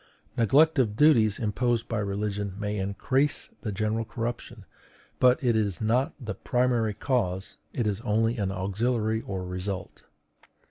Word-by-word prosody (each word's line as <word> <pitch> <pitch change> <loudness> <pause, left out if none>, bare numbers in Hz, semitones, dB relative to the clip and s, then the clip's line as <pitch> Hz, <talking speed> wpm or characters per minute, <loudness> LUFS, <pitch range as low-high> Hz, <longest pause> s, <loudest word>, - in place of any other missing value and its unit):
Neglect 145 +7 +4
of 110 -5 +2
duties 115 -7 +5
imposed 115 +1 0
by 115 - -2
religion 100 -1 -2
may 105 0 -2
increase 130 +9 0
the 110 - -3
general 110 +3 -1
corruption, 120 +1 -5 0.5
but 125 +1 +5
it 120 -3 +3
is 105 -4 0
not 120 +5 +1
the 110 -5 -4
primary 120 -2 0
cause; 95 -9 -1
it 120 - -2
is 105 0 -1
only 115 0 +1
an 100 -3 -1
auxiliary 110 +4 -1
or 95 -4 -5
result. 90 +1 -5
110 Hz, 140 wpm, -27 LUFS, 100-120 Hz, 0.5 s, duties